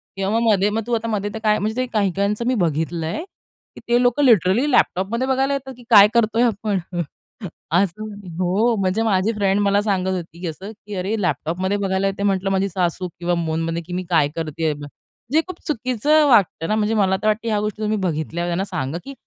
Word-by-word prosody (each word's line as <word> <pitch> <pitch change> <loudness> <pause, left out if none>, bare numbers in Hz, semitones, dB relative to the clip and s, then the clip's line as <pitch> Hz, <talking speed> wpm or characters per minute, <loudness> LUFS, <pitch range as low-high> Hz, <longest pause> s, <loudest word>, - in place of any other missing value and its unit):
किंवा 195 +3 0
मग 230 -1 +2
मध्ये 200 0 +2
मग 220 +2 -1
तू 240 - -2
आता 230 0 0
मध्ये 205 -2 -1
तर 220 - -5
काय 215 -1 +3
म्हणजे 215 +2 -2
ते - - 0
काही-काहींचं 200 +2 0
मी 255 - +2
बघितलंय, 165 - -2 0.5
की - - -10
ते 240 +1 +3
लोक 245 +3 +2
लिटरली 235 - +4
लॅपटॉपमध्ये 230 +3 +1
बघायला 265 +1 +1
येतात, 265 -1 -4
की 245 - -14
काय 205 -3 +9
करतोय 230 0 +2
आपण. 210 -3 0 0.9
असं 185 +3 +1 0.4
हो, 200 +6 +2
म्हणजे 190 +3 0
माझी 205 -1 +2
फ्रेंड 200 -2 +1
मला 200 0 +2
सांगत 195 -3 0
होती, 170 -1 -8
की 180 - -3
असं, 190 +6 -7
की 210 -1 -10
अरे, 190 +4 -2
लॅपटॉपमध्ये 180 +4 -1
बघायला 195 -1 0
येते 195 +1 -3
म्हटलं 195 -1 +1
माझी 195 +1 +1
सासू 180 0 -1
किंवा 175 0 0
फोनमध्ये, 165 +1 -2
की 175 +2 -9
मी 180 +1 -2
काय 160 -5 +3
करतेय. 160 -1 -2 0.6
जे 315 - +5
खूप 370 -2 -8
चुकीचं 290 +3 +2
वाटतं 195 -8 +3
ना. 215 - +1
म्हणजे 215 0 0
मला 190 -3 +2
तर 215 - 0
वाटतं 215 +2 0
ह्या 215 -2 +1
गोष्टी 210 +1 -4
तुम्ही 215 0 0
बघितल्यावर 170 -1 -2
त्यांना 180 +3 -1
सांगा, 170 -6 -3
की 275 - -7
200 Hz, 200 wpm, -21 LUFS, 180-225 Hz, 0.9 s, काय